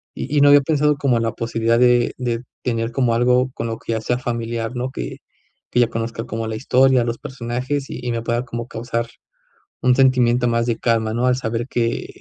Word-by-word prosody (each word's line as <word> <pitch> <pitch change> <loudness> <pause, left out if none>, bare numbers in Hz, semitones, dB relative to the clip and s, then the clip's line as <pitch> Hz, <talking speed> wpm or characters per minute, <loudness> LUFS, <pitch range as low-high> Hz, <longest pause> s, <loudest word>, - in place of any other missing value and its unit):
Y 145 +3 -3
y - - +5
no 145 - +7
había 145 0 +7
pensado 150 0 +1
como 140 -3 +1
en 115 - 0
la 115 - 0
posibilidad 115 0 0
de 125 -1 +4
de 120 -2 -2 0.2
tener 115 -2 -1
como 125 -1 +1
algo 125 +2 +2
con 115 - -4
lo 115 - -3
que 115 - -4
ya 110 - -2
sea 120 +2 0
familiar, 115 -1 -3
¿no? 125 +1 -2
Que - - -6 0.5
que - - +1
ya 120 - +4
conozca 115 0 -4
como 115 -1 -4
la 110 - -3
historia, 130 +1 +3
los 120 0 -2
personajes, 130 +1 -4
y - - -6
y 120 - -1
me 115 -1 -2
pueda 120 +1 -1
como 120 -1 -5
causar 115 0 -3 0.7
un 125 0 +4
sentimiento 125 -2 +3
más 115 0 +1
de 120 -1 0
calma, 115 -2 0
¿no?, 120 +2 +1
al 125 - +3
saber 115 -1 -2
que 115 -1 -1
120 Hz, 220 wpm, -20 LUFS, 115-125 Hz, 0.7 s, no